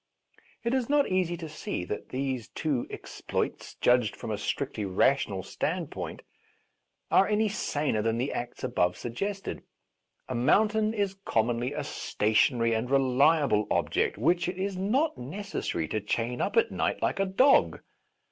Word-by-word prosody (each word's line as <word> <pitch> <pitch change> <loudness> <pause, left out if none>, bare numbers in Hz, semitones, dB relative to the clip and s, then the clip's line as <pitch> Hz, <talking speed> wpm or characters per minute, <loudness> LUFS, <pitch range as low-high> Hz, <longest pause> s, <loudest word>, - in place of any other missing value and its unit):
It 235 +1 0
is 260 -2 0
not 290 -1 +3
easy 180 -2 +1
to 165 -1 -6
see 150 -11 -4
that 105 - -5
these 130 -3 -2
two 145 -6 -2
ex - - -9
ploits, - - -3
judged 120 -4 +3
from - - -6
a 105 - -1
strictly 115 +1 -2
rational 100 0 +1
stand - - -3
point, - - -6 0.9
are 195 - +5
any 215 +1 +2
saner 145 - -1
than 115 +1 0
the 130 +4 -1
acts 120 0 -5
above 90 -9 +1
suggested. 195 - -4 0.7
A 130 - -3
mountain 215 - +3
is 200 -2 -1
commonly 120 - 0
a 150 0 -3
stationary 115 -2 +1
and 115 +2 -1
reliable 135 -3 +3
object - - +1
which 170 - +2
it 180 - -5
is 195 +1 -2
not 230 - 0
necessary 140 - -3
to 110 - -1
chain 115 +4 -2
up - - -1
at - - +4
night - - -1
like - - 0
a 195 - +3
dog. 255 +9 +4
140 Hz, 155 wpm, -28 LUFS, 115-195 Hz, 0.9 s, are